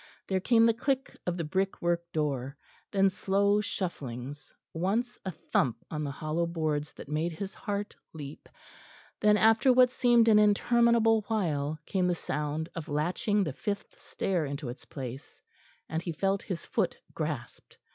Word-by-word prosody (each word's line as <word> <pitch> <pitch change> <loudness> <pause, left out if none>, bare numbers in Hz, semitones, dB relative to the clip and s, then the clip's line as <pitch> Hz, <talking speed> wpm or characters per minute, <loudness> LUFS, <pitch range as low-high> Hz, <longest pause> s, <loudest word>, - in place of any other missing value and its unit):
There 190 -1 +1
came 225 +4 +4
the 230 - +5
click 270 +3 -1
of 175 0 0
the 170 - -1
brickwork 170 0 -1
door; 140 -3 -2 0.3
then 195 -1 +4
slow 200 +2 +2
shufflings; 140 - -5 0.2
once 210 +9 0
a 190 - -3
thump 135 -7 0
on 155 -1 -2
the 145 - -2
hollow 155 +4 -1
boards 155 -3 -1
that - - -10
made 155 +4 -1
his 195 +3 -5
heart 205 0 -4 0.2
leap; 145 -2 -9 0.7
then 210 0 +5
after 225 +4 +5
what 250 0 +6
seemed 240 -2 +4
an 215 -2 +7
interminable 225 +1 +4
while, 155 -9 0
came 185 -3 +1
the 175 - +1
sound 150 0 -3
of 165 0 -6
latching 180 +7 +1
the 155 -7 -3
fifth 200 +8 -5
stair 180 -4 -1
into 140 -2 -4
its 120 - -9
place; 130 -1 -8 0.4
and 160 0 -2
he 170 - -3
felt 195 +4 0
his 180 -3 -5
foot - - 0 0.2
grasped. 150 -6 -5
175 Hz, 155 wpm, -29 LUFS, 150-210 Hz, 0.7 s, an